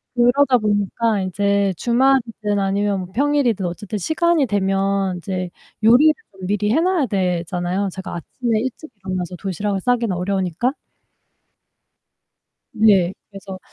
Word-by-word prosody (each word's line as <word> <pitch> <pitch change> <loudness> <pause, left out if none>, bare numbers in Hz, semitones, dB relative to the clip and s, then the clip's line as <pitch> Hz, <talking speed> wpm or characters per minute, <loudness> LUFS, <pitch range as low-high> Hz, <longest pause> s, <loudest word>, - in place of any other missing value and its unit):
그러다 250 +2 +4
보니까 210 +1 0
이제 200 +1 0
주말이든 235 -4 +1
아니면 195 0 0
뭐 180 - -8
평일이든 265 -7 +1
어쨌든 205 +4 -5
시간이 320 - +1
되면 195 -1 0
이제 185 0 -4 0.3
요리를 265 +8 +6 0.2
좀 190 -1 -8
미리 210 +1 0
해 315 - +3
놔야 355 -7 +1
되잖아요. 180 0 -1
제가 190 -2 -7
아침에 225 +5 -2
일찍 260 +5 -5
일어나서 185 -2 -4
도시락을 195 +1 -3
싸기는 235 -6 0
어려우니까. 190 - -1 2.0
네, 195 -4 +4 0.2
그래서 195 -2 -9
200 Hz, 305 characters per minute, -20 LUFS, 190-240 Hz, 2.0 s, 요리를